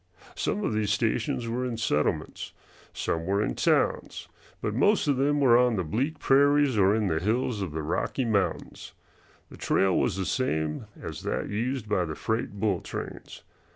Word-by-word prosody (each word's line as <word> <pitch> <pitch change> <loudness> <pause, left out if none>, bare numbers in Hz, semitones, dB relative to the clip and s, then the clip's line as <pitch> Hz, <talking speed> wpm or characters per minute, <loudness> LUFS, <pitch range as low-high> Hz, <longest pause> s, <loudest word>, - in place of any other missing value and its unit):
Some 210 - -1
of 120 - 0
these 105 -1 0
stations 115 +2 0
were 120 +2 -2
in 125 -2 -3
settlements, 75 -9 -1 0.4
some 80 - -2
were 100 +2 +1
in - - -1
towns, - - 0 0.3
but 105 - -2
most 185 - +3
of 140 -3 +2
them 145 +2 +2
were 125 -4 +6
on 125 -2 +3
the 95 - -1
bleak 130 - -2
prairies 145 -1 +4
or 100 0 +4
in 110 -1 0
the 80 -4 0
hills 110 +3 0
of 95 -5 -3
the 80 0 -4
Rocky 90 - -1
Mountains. 100 -4 -2 0.6
The - - -11
trail 95 -2 +2
was - - +1
the 95 - -2
same 80 - -1
as - - -7
that - - -3
used 115 +2 -2
by 95 -4 +1
the 80 -2 -5
freight 110 +2 -2
bull 100 -2 0
trains. - - -8
110 Hz, 180 wpm, -27 LUFS, 95-130 Hz, 0.6 s, were